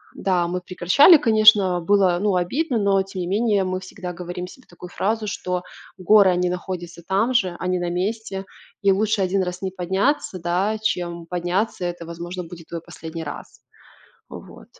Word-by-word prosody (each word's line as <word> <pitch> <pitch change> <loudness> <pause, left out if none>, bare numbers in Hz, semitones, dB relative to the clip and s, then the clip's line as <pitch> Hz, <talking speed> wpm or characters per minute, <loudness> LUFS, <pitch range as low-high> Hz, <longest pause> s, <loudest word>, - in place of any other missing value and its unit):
да, 180 -3 0
мы 180 +1 -3
прекращали, 185 - +6
конечно. 215 -7 +5
Было 185 0 +3
ну 205 -2 +1
обидно, 245 - 0
но 200 -1 +2
тем 190 -1 -7
не 175 - -3
менее 205 +1 +1
мы 185 0 -2
всегда 185 -1 -7
говорим 180 +1 -6
себе 255 +7 -15
такую 175 0 -12
фразу, 215 +4 -2
что 180 -3 -3 0.4
"горы 195 +1 +5
они 180 0 +1
находятся 175 -1 -6
там 205 +7 +1
же, 185 -6 +1
они 185 0 -1
на 175 0 -2
месте 195 +1 -3 0.4
и 200 -1 +4
лучше 210 +2 +1
один 190 +1 +1
раз 180 0 -5
не 190 - -2
подняться, 190 - -1
да, 185 +6 0
чем 170 -5 -2
подняться, 180 +3 -2
и - - +1
это, 175 -1 -6
возможно, 175 +2 -6
будет 165 -1 -12
твой 170 -1 -6
последний 165 -1 -8
раз". 145 -2 -9 0.7
Вот. - - -12
185 Hz, 175 wpm, -22 LUFS, 175-200 Hz, 0.7 s, прекращали